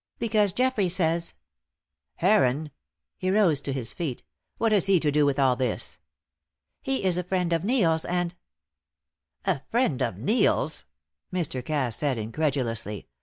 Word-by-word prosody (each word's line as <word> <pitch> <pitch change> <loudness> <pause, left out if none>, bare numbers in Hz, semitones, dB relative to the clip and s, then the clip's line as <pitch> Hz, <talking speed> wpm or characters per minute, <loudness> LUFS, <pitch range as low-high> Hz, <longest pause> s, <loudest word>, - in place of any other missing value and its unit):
"Because 215 -3 +2
Geoffrey 235 -3 +1
says 170 -1 0 0.4
" - - -61
"Heron!" 150 -6 +3 0.5
He 185 - -1
rose 185 -8 +3
to 140 - -3
his 130 -4 -3
feet. 155 -8 -4 0.3
"What 225 -1 +1
has 205 -2 +3
he 195 -2 +5
to 150 -2 +1
do 145 0 +3
with 140 -1 0
all 135 -2 +3
this?" 130 0 -3 0.8
"He 270 -5 -1
is 180 -2 +2
a - - -2
friend 180 -1 0
of 165 0 0
Neil's, 185 -9 +2
and 175 0 -1 0.6
" 80 0 -40
"A 180 -8 0
friend 225 - +1
of 90 - -1
Neil's?" 205 - +1 0.5
Mr. 160 -8 -2
Cass 130 -5 -1
said, 140 -4 0
incredulously. 115 - -2
160 Hz, 155 wpm, -26 LUFS, 130-190 Hz, 0.8 s, he